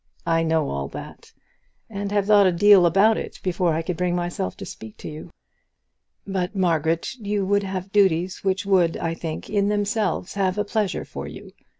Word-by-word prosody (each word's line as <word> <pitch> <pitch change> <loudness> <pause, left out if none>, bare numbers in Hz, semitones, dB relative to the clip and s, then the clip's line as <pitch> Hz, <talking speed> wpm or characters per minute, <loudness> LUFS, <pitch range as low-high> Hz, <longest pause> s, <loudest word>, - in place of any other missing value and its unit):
I 165 -1 +2
know 160 -2 +1
all 70 0 -3
that, - - -10 0.6
and 200 -1 -5
have 205 -1 +1
thought 205 -2 +6
a - - +3
deal 190 0 +6
about 200 +6 +4
it - - -7
before 175 -3 +1
I 165 - -1
could 170 0 -3
bring 180 0 0
myself 175 - -3
to - - -7
speak 110 -1 -10
to - - -9
you. 155 0 -8 1.0
But, 190 0 -3
Margaret, 165 - 0
you 205 -2 -1
would 200 +1 +2
have 190 -1 -5
duties 185 -3 +2
which 195 +1 0
would, 180 -4 +3
I 165 - -2
think, 165 -1 -6
in 200 -1 +1
themselves, 205 -2 -1
have 195 -1 0
a 210 - 0
pleasure 205 -1 -1
for - - -7
you. - - -10
185 Hz, 190 wpm, -23 LUFS, 165-200 Hz, 1.0 s, thought